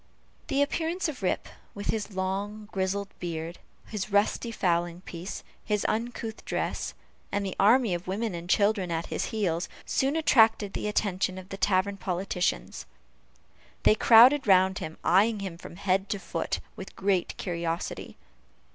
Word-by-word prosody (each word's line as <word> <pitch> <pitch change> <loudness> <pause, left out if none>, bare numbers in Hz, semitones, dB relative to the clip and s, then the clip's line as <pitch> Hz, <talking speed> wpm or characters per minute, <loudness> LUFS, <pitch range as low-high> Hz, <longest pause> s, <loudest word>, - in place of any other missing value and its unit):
The 275 +1 +2
appearance 335 +6 -1
of 290 -7 -6
Rip, 185 - -1 0.3
with 205 - -2
his 210 -2 -4
long, 200 +3 -3
grizzled 195 +1 -1
beard, 165 0 -5 0.3
his 210 -1 -5
rusty 205 +3 +2
fowling 175 -4 0
piece, 180 +1 -7 0.2
his 210 -2 -1
uncouth 225 0 -3
dress, - - -3 0.4
and 200 0 -1
the 190 - -4
army 225 +1 +5
of 175 +1 -4
women 205 +2 -2
and 170 +1 -7
children 200 -2 +2
at 165 0 -2
his - - -1
heels, 180 -6 -1 0.2
soon 270 +3 +1
attracted 225 -9 +4
the - - -3
attention 190 -3 0
of 185 0 -9
the 195 - -5
tavern 195 0 +1
politicians. 180 - -2 1.0
They - - +7
crowded 240 +5 +7
round 190 0 +5
him, 160 +1 -6
eying 205 +4 +4
him 190 -4 -5
from - - -10
head 195 +1 0
to 205 - -1
foot, 175 -3 -3
with 190 - -9
great 190 -2 0
curiosity. 170 -2 -4
195 Hz, 150 wpm, -28 LUFS, 180-215 Hz, 1.0 s, They